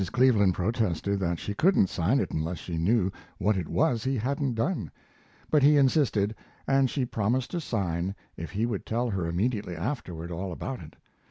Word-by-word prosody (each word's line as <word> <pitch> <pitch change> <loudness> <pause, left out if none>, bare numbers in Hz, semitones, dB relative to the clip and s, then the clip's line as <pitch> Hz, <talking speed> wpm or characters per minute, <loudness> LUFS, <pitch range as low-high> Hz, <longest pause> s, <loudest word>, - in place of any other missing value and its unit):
Cleveland 110 -8 +4
protested 100 -1 0
that 85 -2 0
she 100 - -4
couldn't 165 - +4
sign 95 +9 +1
it - - -1
unless 80 +3 -2
she 85 -2 -4
knew 95 +2 +2 0.3
what 105 +2 +2
it 90 -4 -2
was 125 -8 +1
he 135 0 0
hadn't 135 +2 -1
done; 115 - -1 0.6
but 150 - +5
he 145 +2 +6
insisted, 130 -7 +3 0.3
and 135 -1 +3
she 135 -1 -1
promised 120 +3 -1
to 175 - -2
sign 95 - -2 0.2
if 85 - -6
he 105 +5 -1
would 115 -5 -3
tell 120 +1 0
her 95 -4 -1
immediately 100 +1 -1
afterward 85 - -4
all 90 +2 -4
about 130 +9 -5
it. 75 - -12
105 Hz, 180 wpm, -28 LUFS, 90-130 Hz, 0.6 s, he